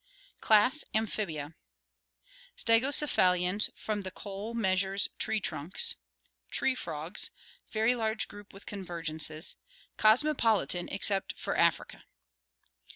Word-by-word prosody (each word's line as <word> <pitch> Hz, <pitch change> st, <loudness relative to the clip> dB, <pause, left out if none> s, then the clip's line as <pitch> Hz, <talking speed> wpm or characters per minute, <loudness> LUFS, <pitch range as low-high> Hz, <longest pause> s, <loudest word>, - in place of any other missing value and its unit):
Class 225 Hz, +8 st, +4 dB
Amphibia 175 Hz, -9 st, -2 dB, 1.0 s
Stegocephalians 215 Hz, -7 st, +3 dB
from 210 Hz, -1 st, -4 dB
the 190 Hz, -, -5 dB
Coal 205 Hz, +4 st, -7 dB
Measures 195 Hz, -2 st, +1 dB
tree 220 Hz, 0 st, +1 dB
trunks. 195 Hz, -, 0 dB, 0.6 s
Tree 265 Hz, -, +1 dB
frogs. 165 Hz, -4 st, -3 dB, 0.4 s
Very 220 Hz, +3 st, +2 dB
large 220 Hz, -2 st, -1 dB
group 205 Hz, 0 st, -13 dB
with 195 Hz, -, -13 dB
convergences. 165 Hz, -5 st, -2 dB, 0.4 s
Cosmopolitan 220 Hz, -6 st, +3 dB
except 195 Hz, 0 st, 0 dB
for -, -, -4 dB
Africa. -, -, 0 dB
205 Hz, 95 wpm, -29 LUFS, 180-225 Hz, 1.0 s, Class